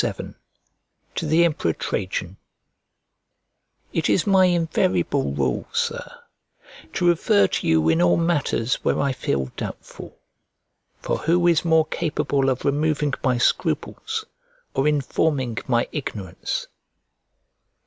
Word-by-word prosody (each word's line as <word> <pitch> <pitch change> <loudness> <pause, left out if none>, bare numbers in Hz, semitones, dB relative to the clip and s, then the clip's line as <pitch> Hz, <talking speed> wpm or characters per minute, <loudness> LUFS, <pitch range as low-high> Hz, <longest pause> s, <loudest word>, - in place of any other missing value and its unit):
XCVII - - -4 0.8
To - - -3
THE 165 +3 +4
EMPEROR 145 - 0
TRAJAN 95 +1 -3 1.6
IT 165 - 0
is 185 - +2
my 190 -2 +5
invariable 160 - +1
rule, 65 -3 -1
Sir, - - -2 0.8
to 175 - +1
refer 160 - +4
to - - -2
you 80 -1 +3
in 80 +1 +3
all 90 0 +4
matters 150 -7 0
where - - +1
I 140 -1 +1
feel 70 - -2
doubtful; - - -8 0.8
for - - -1
who 175 +2 +2
is 170 -2 +4
more 160 -2 +4
capable 145 -4 0
of 130 -1 -2
removing 145 0 +1
my 130 -2 +2
scruples, 445 - -1 0.5
or 135 - +1
informing 140 -4 0
my 120 -2 +2
ignorance? 105 - -4
140 Hz, 120 wpm, -23 LUFS, 100-165 Hz, 1.6 s, my